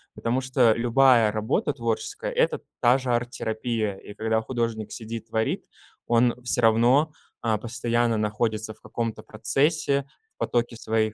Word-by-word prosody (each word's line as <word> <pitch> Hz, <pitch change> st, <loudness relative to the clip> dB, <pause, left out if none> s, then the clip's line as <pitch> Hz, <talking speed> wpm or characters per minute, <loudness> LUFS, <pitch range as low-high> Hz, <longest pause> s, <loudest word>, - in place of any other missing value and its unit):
потому 120 Hz, +3 st, -1 dB
что 130 Hz, -3 st, +3 dB
любая 120 Hz, -1 st, +4 dB
работа 110 Hz, +7 st, 0 dB
творческая 275 Hz, -, -3 dB
это -, -, +1 dB, 0.2 s
та 125 Hz, +1 st, +5 dB
же 130 Hz, -1 st, -5 dB
арт-терапия, 115 Hz, -3 st, -2 dB
и 105 Hz, -, -11 dB
когда 110 Hz, +1 st, 0 dB
художник 115 Hz, -3 st, -3 dB
сидит 115 Hz, 0 st, -6 dB
творит, 110 Hz, 0 st, -1 dB, 0.4 s
он 120 Hz, 0 st, +4 dB
всё 125 Hz, 0 st, 0 dB
равно, 120 Hz, +7 st, +4 dB, 0.3 s
а, 110 Hz, -2 st, +1 dB
постоянно 120 Hz, 0 st, 0 dB
находится 110 Hz, 0 st, -1 dB
в -, -, -24 dB
каком-то 115 Hz, +1 st, -4 dB
процессе, 140 Hz, +4 st, +1 dB, 0.3 s
в -, -, -67 dB
потоке 120 Hz, 0 st, 0 dB
своих 110 Hz, -1 st, 0 dB
115 Hz, 140 wpm, -25 LUFS, 110-125 Hz, 0.4 s, та